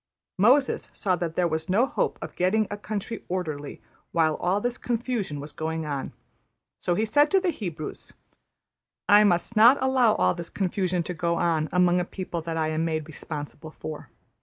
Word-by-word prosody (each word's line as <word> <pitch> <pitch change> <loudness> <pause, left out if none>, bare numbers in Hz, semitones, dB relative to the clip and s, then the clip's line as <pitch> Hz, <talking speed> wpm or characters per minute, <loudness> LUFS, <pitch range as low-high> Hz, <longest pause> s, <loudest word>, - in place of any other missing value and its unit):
Moses 260 +7 +3
saw 185 -2 +1
that 165 -2 -3
there 180 -1 +2
was 160 0 -3
no 210 +7 +4
hope - - -1
of - - -8
getting 205 +5 +2
a - - -2
country 210 +2 -5
orderly 155 -6 -4 0.3
while 160 -2 +2
all 185 +3 +1
this 245 +3 -2
confusion 230 - -2
was 145 +1 -7
going 160 0 -3
on; 140 -3 -4 0.7
so 175 - 0
he 215 - +1
said 290 +7 +4
to 385 - +4
the 370 -2 0
Hebrews, 170 - -6 0.9
``I 210 +1 +7
must 175 +4 +1
not 235 +6 +7
allow 260 -4 +3
all 90 0 +2
this 170 - -7
confusion 185 -2 -1
to 180 - -4
go 170 0 0
on 160 -3 +1
among 180 0 +3
a - - +1
people 180 -2 -5
that 165 0 -4
I 155 -1 0
am 155 +1 -1
made 160 -2 -1
responsible 155 0 -7
for. 155 -1 -8
180 Hz, 185 wpm, -26 LUFS, 160-215 Hz, 0.9 s, ``I